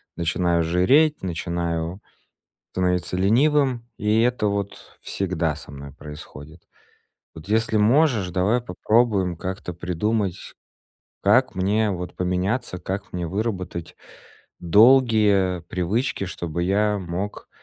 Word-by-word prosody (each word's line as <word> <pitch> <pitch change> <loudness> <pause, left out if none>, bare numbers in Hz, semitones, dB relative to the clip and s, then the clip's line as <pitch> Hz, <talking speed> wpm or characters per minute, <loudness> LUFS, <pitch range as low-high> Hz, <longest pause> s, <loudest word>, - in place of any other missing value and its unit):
начинаю 85 0 +1
жиреть, 130 - +3
начинаю 85 +1 -3 0.7
становиться 90 0 0
ленивым, 125 +4 +2
и 105 +1 +2
это 120 -3 +1
вот 100 -1 -5
всегда 85 -5 -2
со 75 - -11
мной 70 0 -9
происходит. 75 +2 -11 0.7
Вот 80 +3 -12
если 110 0 +1
можешь, 115 - +3
давай 100 +7 +1
попробуем 105 -3 +1
как-то 95 -1 -5
придумать, 90 +3 -2 0.7
как - - +3
мне 105 +3 +1
вот 90 -1 -6
поменяться, 90 +3 -1
как 95 +2 -5
мне 90 -2 -3
выработать 95 -4 -4 0.6
долгие 105 -2 +4
привычки, 95 +7 -2
чтобы 85 -1 -4
я 105 +2 +1
мог 95 +3 -5
95 Hz, 105 wpm, -23 LUFS, 85-110 Hz, 0.7 s, долгие